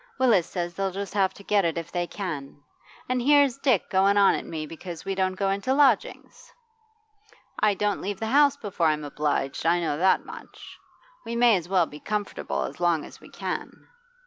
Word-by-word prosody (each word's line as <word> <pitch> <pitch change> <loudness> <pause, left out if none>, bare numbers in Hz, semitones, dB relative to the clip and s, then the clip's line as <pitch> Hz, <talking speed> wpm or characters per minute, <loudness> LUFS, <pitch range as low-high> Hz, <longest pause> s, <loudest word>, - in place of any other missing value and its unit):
Willis 230 -10 +3
says 175 -2 -4
they'll 195 +2 -1
just 195 +1 -6
have 195 -2 +2
to 200 - -13
get 205 0 +2
it 170 -1 -1
if 165 0 -5
they 175 -1 -2
can. 145 -8 -6 0.4
And 255 0 0
here's 280 -1 +4
Dick 255 - +2
going 195 +2 +3
on 200 -1 +6
at - - -4
me 155 -2 -5
because 165 +1 -9
we 195 - -2
don't 190 -1 0
go 195 0 0
into 200 +7 0
lodgings! 275 -6 +1 1.1
I 210 -1 +3
don't 205 +1 -1
leave 200 0 -4
the 225 - -3
house 285 +4 +4
before 195 - -1
I'm 155 -1 0
obliged, 145 -1 -2
I 170 +2 +3
know 160 -3 -2
that 190 +2 +3
much. - - -12 0.4
We 230 - -5
may 235 -2 +5
as 175 -2 -4
well 185 -3 +3
be 150 -1 -11
comfortable 210 +2 -3
as - - -7
long 170 -3 +1
as - - -14
we - - -14
can. - - -4
195 Hz, 200 wpm, -25 LUFS, 170-215 Hz, 1.1 s, on